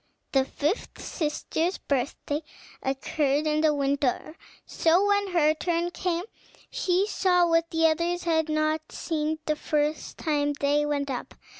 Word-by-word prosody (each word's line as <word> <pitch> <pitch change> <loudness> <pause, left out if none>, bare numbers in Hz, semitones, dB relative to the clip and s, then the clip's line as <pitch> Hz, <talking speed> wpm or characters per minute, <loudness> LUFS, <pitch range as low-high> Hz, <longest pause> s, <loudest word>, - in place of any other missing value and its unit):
The 265 -1 +3
fifth 300 - -2
sister's 325 +2 -2
birthday 280 +2 -2 0.4
occurred 275 +2 0
in 305 0 +1
the 310 -1 +4
winter; 280 +1 0 0.3
so 340 +4 +3
when 405 0 +2
her 325 -5 +3
turn 340 +2 -1
came, 355 -1 -1 0.5
she 385 -6 +1
saw 360 -4 +3
what 330 0 +2
the 325 0 +2
others 340 +2 +1
had 320 -2 +1
not 310 0 0
seen 315 -1 -2
the 305 - +1
first 300 0 -1
time 290 -2 0
they 290 +1 +1
went 285 -1 -1
up. 250 - -5
310 Hz, 140 wpm, -27 LUFS, 295-340 Hz, 0.5 s, the